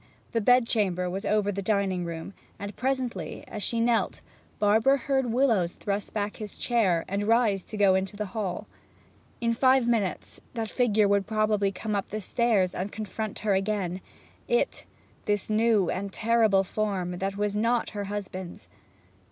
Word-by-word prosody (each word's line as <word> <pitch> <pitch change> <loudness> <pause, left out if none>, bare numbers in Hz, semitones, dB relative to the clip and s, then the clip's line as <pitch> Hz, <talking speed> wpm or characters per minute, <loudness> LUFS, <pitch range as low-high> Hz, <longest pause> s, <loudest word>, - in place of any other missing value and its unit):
The 230 - 0
bed 245 +2 +5
chamber 185 -6 +1
was 195 +2 -4
over 210 -1 +2
the 200 0 -3
dining 195 -3 0
room, 165 +3 -6 0.2
and 200 0 -6
presently 260 -2 -2
as 210 - -6
she 230 +3 -1
knelt 230 0 +1 0.4
Barbara 220 +6 +4
heard 265 -1 0
Willowes 225 -9 +2
thrust 200 0 -3
back 205 -1 -3
his 210 -2 -7
chair, 195 -9 +1
and 200 +2 -1
rise 220 -5 +3
to 215 - -7
go 200 -2 +5
into 190 +2 -1
the 210 - -2
hall. 195 -5 -3 0.8
In 230 0 +2
five 260 0 +4
minutes 220 -6 -1
that 225 -2 -3
figure 215 -4 +3
would 200 -1 +2
probably 215 -2 +1
come 210 +2 -3
up 200 - -2
the 215 - -3
stairs 210 -3 +1
and 195 +3 -3
confront 215 0 -4
her 205 - +3
again; 190 -2 -1 0.5
it, 485 - 0 0.4
this 205 0 0
new 215 -3 +3
and 195 +1 -3
terrible 220 -3 +3
form, 185 -3 -2
that 195 +1 -2
was 205 0 -1
not 230 +3 +1
her 205 -1 -4
husband's. 190 -3 -6
210 Hz, 165 wpm, -27 LUFS, 195-230 Hz, 0.8 s, bed